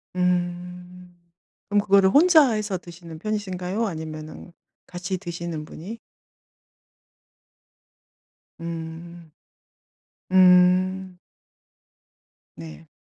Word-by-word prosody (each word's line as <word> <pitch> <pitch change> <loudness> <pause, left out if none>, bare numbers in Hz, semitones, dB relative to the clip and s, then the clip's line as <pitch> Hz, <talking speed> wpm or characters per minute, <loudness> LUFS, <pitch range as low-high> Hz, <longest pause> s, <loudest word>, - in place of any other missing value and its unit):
음. 180 0 -3 0.6
그럼 205 0 +3
그거를 195 -1 +4
혼자 310 - +6
해서 210 -3 -2
드시는 170 -2 -12
편이신가요? 200 0 -3
아니면은 155 -1 -8 0.3
같이 185 +1 -4
드시는 170 -4 -6
분이 200 +10 -9 2.6
음 165 0 -8 1.0
음. 185 0 +4 1.4
네. 165 0 -11
180 Hz, 150 characters per minute, -24 LUFS, 170-190 Hz, 2.6 s, 혼자